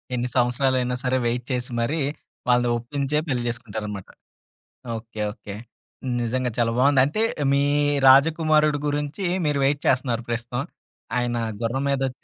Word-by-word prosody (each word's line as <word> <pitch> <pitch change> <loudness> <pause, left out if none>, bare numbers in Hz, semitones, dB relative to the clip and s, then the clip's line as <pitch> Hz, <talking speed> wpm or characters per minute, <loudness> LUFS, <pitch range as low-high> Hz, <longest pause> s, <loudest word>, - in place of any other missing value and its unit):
ఎన్ని 125 0 -1
సంవత్సరాలైనా 125 0 +2
సరే 130 +1 +1
వెయిట్ 120 +1 -1
చేసి 125 0 -2
మరి 150 +7 0 0.5
వాళ్ళని 125 0 +3
ఒప్పించే 140 +4 -2
పెళ్లి 125 -4 -1
చేసుకుంటారన్నమాట. 105 -4 -6 0.9
ఓకే. 110 0 -10
ఓకే. 105 -3 -9 0.7
నిజంగా 125 +1 -1
చాలా 115 -1 +2
బావుంది. 135 +1 +5
అంటే 155 +10 -1 0.3
మీ 140 0 +3 0.4
రాజకుమారుడు 155 +2 +5
గురించి, 145 +6 -2 0.2
మీరు 145 -1 +1
వెయిట్ 140 +1 +1
చేస్తన్నారు 125 -2 +1
ప్రస్తుతం. 120 +2 -2 0.6
ఆయన 120 -1 -1 0.2
గుర్రం 120 +4 -1
మీదొచ్చి 135 -2 -2
125 Hz, 130 wpm, -24 LUFS, 120-140 Hz, 0.9 s, బావుంది